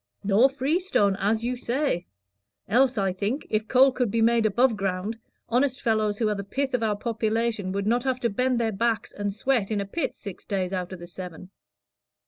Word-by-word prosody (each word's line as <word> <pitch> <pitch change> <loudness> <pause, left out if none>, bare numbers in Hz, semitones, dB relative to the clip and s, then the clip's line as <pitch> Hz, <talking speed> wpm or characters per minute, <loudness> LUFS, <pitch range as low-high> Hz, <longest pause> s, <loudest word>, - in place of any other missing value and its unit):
"Nor 210 +6 +5
freestone, 275 - +1
as 220 +3 0
you 250 +1 -1
say; 245 - -1 0.6
else, 255 +2 +3
I 195 -2 +1
think, 205 +9 -2
if 215 0 0
coal 265 +1 +5
could 250 -3 0
be 230 - 0
made 230 -1 +4
above 235 +3 +3
ground, 195 +2 -2 0.3
honest 260 +2 +1
fellows 215 -3 +1
who 225 - +1
are 210 - +1
the 200 -1 -4
pith 270 +6 -2
of 250 - +1
our 215 -2 +1
population 225 -3 -1
would 200 +1 -2
not 240 +3 +2
have 260 -1 0
to 235 - +1
bend 250 +3 +1
their 225 -1 +1
backs 225 +2 -1
and 205 0 -3
sweat 220 0 0
in 215 -2 0
a 200 - -2
pit 270 +8 -3
six 200 -5 -9
days 190 -2 -1
out 180 -1 -3
of 185 - -6
the 175 - -9
seven. 180 0 -9
220 Hz, 205 wpm, -26 LUFS, 200-250 Hz, 0.6 s, Nor